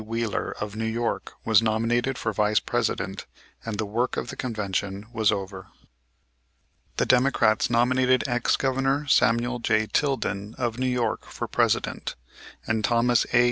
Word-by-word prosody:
Wheeler, 115 0 -2
of 105 -1 -5
New 110 +1 -2
York, 115 +1 -2
was 110 -1 +5
nominated 115 +4 0
for 110 - -2
Vice 105 +1 +2
President - - -2 0.4
and 115 -2 -4
the 110 - -1
work 115 +5 -1
of - - -3
the - - -8
Convention 105 -4 -3
was 110 -3 +3
over. 95 -2 -5 1.3
The - - +2
Democrats 125 -4 +3
nominated 130 +2 +3
ex 120 -2 +1
Governor 135 +2 0
Samuel 120 -2 +2
J. 110 -1 +1
Tilden, 110 -6 -1
of 120 -1 -2
New 130 - 0
York, 120 -3 -1
for - - -6
President, - - 0 0.5
and 110 -1 -1
Thomas 120 +1 +2
A. 120 - +5
115 Hz, 145 wpm, -25 LUFS, 110-125 Hz, 1.3 s, was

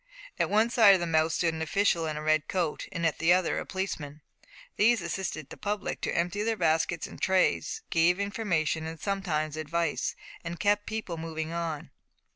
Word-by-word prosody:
At - - +2
one 220 +3 +3
side 215 -5 +7
of - - 0
the 175 - -1
mouth 160 -1 +2
stood 165 0 +1
an 160 - -5
official 170 0 +1
in 155 -1 -3
a 155 - -5
red 155 0 +2
coat, 175 -5 -2
at 165 -4 -1
the 165 +1 +4
other 185 -1 +1
a - - -6
policeman. 155 -6 -4 0.5
These 230 +2 +4
assisted 170 -4 -4
the - - -8
public 210 -1 -3
to - - -1
empty 175 +4 0
their 225 +1 0
baskets 165 -1 +1
and - - -11
trays, 190 - +1
gave 170 +3 +3
information, 165 -6 -1
sometimes 155 -4 -2
advice, 165 +2 -1 0.3
and 170 0 -5
kept 205 0 +2
people 220 -6 -4
moving 160 0 -4
on. 165 -3 -4
170 Hz, 180 wpm, -28 LUFS, 160-200 Hz, 0.5 s, side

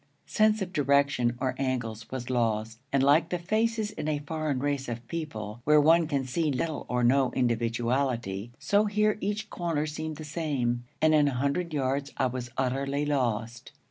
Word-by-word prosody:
Sense 215 -1 +2
of 185 0 -8
direction 140 -5 +2
or 130 -1 0
angles 120 -4 -2
was 130 -1 -5
lost, 115 -2 0
and, 140 -1 +2
like 150 +5 +4
the 180 - -1
faces 215 +4 0
in 150 - -5
a 155 -1 +1
foreign 155 -2 -2
race 140 -1 -1
of 120 0 -6
people, 120 -9 -5
where 150 +2 +5
one 165 +2 +5
can 140 -4 -1
see 155 +4 0
little 150 +4 -2
or 125 0 0
no 130 +2 +4
individuality, 120 -2 0
so 205 +1 +2
here, 210 +1 +1
each 210 +2 -3
corner 165 -4 -1
seemed 155 +1 -4
the 155 - -7
same, 135 -7 -1 0.2
and 155 0 +5
in 150 -1 +5
a 140 - -1
hundred 140 +7 -1
yards 140 0 -1
I - - +2
was 125 -1 -3
utterly 135 +2 0
lost. 120 -3 -2
140 Hz, 175 wpm, -28 LUFS, 120-160 Hz, 0.2 s, where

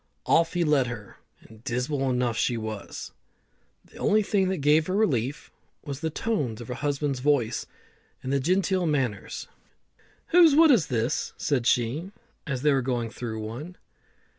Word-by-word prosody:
Off 165 0 +3
he 175 - +2
led 150 -5 +3
her, 115 -5 -8 0.2
and 110 0 -17
dismal 135 +2 -1
enough 125 -2 0
she 120 +1 0
was. 110 -2 -6 0.7
The - - -17
only 215 +1 +2
thing 195 -2 +1
that 190 - -1
gave 150 +1 +3
her 185 - -1
relief 140 - 0 0.3
was 140 -2 -5
the 160 +1 -2
tones 150 - -2
of 120 - -9
her - - -2
husband's 145 0 -2
voice 130 -4 +1 0.6
and 130 +1 -2
his 140 - +2
genteel 185 +3 +1
manners. 130 -9 -2 0.8
"Whose 335 -4 +6
wood 320 0 +7
is 225 - +4
this?" 115 -1 -1
said 130 -5 0
she, 130 +10 0 0.4
as 135 -3 -3
they 150 -1 +4
were 135 - +2
going 120 -3 -2
through 110 -3 -5
one. 130 +12 -7
140 Hz, 165 wpm, -26 LUFS, 120-165 Hz, 0.8 s, wood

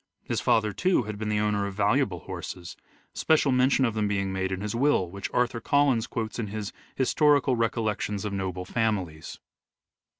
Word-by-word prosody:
His - - -2
father, 110 -2 +2
too, 180 - +2
had 105 -1 -6
been 110 -1 -3
the 105 0 +1
owner 105 -1 0
of 100 - -7
valuable 105 - +1
horses, 90 -1 -7 0.4
special 155 -3 +2
mention 130 +1 +3
of 115 - 0
them 105 -1 0
being 100 -2 -1
made 95 0 -2
in 95 0 -3
his 105 0 -3
will, 115 -8 +2
which 100 0 -5
Arthur 120 -1 0
Collins 140 -4 +2
quotes 110 0 -4
in 110 - -2
his 105 0 -5
" - - -30
Historical 140 0 +3
Recollections 110 -3 -1
of 105 - -3
Noble 95 -2 -3
Families." 95 -8 -2
105 Hz, 185 wpm, -27 LUFS, 100-125 Hz, 0.4 s, mention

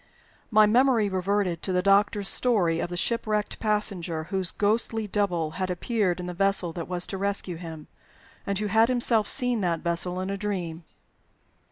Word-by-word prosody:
My 215 -1 +6
memory 235 -1 +3
reverted 190 -2 -1
to 190 - -3
the 180 0 +1
doctor's 200 0 +2
story 190 -11 +3
of - - -3
the 175 - -5
shipwrecked 215 0 -1
passenger, 195 -7 0
whose 190 +1 0
ghostly 220 +1 0
"double" 180 -6 -1
had 185 - -1
appeared 185 -1 -1
in 180 - -5
the 180 - -5
vessel 195 -2 +1
that 170 -1 -6
was 180 -1 -1
to 195 - -6
rescue 195 -3 -2
him, 160 -3 -9 0.6
and 200 -1 -1
who 210 - -2
had 220 +3 +3
himself 235 -4 +1
seen 245 -3 +1
that 170 -3 -1
vessel 175 +1 -2
in 185 +1 -3
a 200 - -3
dream. 180 -5 -4
195 Hz, 175 wpm, -26 LUFS, 175-210 Hz, 0.6 s, My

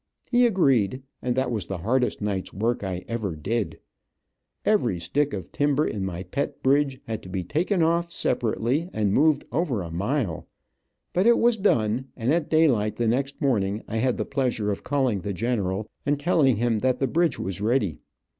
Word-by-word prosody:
He 245 0 +5
agreed, 135 - +2 0.2
and 125 -1 -1
that 130 -1 0
was 110 -5 -2
the 95 - -3
hardest 125 +9 0
nights 100 -3 -2
work 115 +3 -1
I 95 -2 -4
ever 110 -7 -3
did. 105 +8 -2 0.9
Every 120 - +2
stick 140 - 0
of 95 -7 -6
timber 145 +1 +1
in 100 -2 -3
my 95 -1 -4
pet 140 +9 -4
bridge 135 0 +2
had 110 -1 -4
to 95 - -11
be 95 0 -3
taken 165 - +1
off 170 +1 +1
separately, 125 +5 0
and 105 -2 +1
moved 150 +2 +3
over 135 - 0
a 85 - -7
mile, 100 - -2 0.7
but 185 +5 +3
it 235 - +6
was 240 0 +4
done, 125 - +1
and 125 +4 +1
at 165 -2 0
daylight 130 -10 +3
the 120 - 0
next 135 +4 0
morning 105 -6 0
I 110 - -3
had 125 +2 +1
the - - -2
pleasure 120 -6 -1
of 100 - -4
calling 130 -8 0
the 100 +1 -3
general 105 -1 -1 0.2
and 145 0 0
telling 145 -5 +3
him 115 0 +1
that 130 +2 +1
the 135 - +1
bridge 165 +1 +1
was 95 0 -4
ready. 105 - +1
120 Hz, 185 wpm, -25 LUFS, 105-145 Hz, 0.9 s, it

